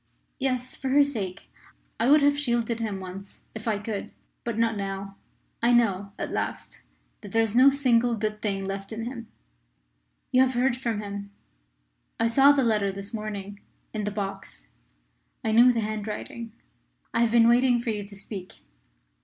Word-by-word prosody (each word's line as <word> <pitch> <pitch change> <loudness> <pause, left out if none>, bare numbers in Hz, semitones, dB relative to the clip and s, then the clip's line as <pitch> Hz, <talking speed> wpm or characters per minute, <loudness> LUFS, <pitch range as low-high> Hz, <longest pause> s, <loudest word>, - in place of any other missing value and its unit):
"Yes; 255 -2 -1
for 265 - -4
her 285 +2 +6
sake. 210 -10 -5 0.5
I 230 +3 +3
would 300 +1 +7
have 285 0 +4
shielded 235 -5 0
him 210 -4 -3
once 190 +1 -9
if 220 +1 -7
I 215 -2 +1
could. 205 0 -5 0.3
But 235 -2 -3
not 230 -1 +2
now. 195 0 -4 0.5
I 235 +1 +4
know, 200 -4 +2
at - - -4
last, - - -4 0.4
that 205 -3 -10
there 225 0 +4
is 225 0 -2
no 260 +3 +8
single 245 -4 +2
good 215 -1 -3
thing 195 -2 -1
left 195 +1 -5
in 225 +1 -4
him." 235 -2 -6 1.0
"You 255 - +5
have 260 -1 +2
heard 245 0 +2
from 235 -4 -2
him. 200 -1 -6 0.9
I 230 - +3
saw 270 +5 +6
the 280 -2 +3
letter 210 -4 +2
this 200 +3 -7
morning, 205 -2 -5 0.3
in 215 -2 -2
the - - 0
box. 195 - -6 0.8
I 220 - +2
knew 240 +3 +7
the 235 -2 0
handwriting. 215 +2 -5 0.6
I 230 - +2
have 235 - +4
been 230 0 +5
waiting 245 +1 +4
for 235 -1 -2
you 210 -1 -3
to 200 0 -11
speak." 195 -2 -9
225 Hz, 175 wpm, -26 LUFS, 200-240 Hz, 1.0 s, no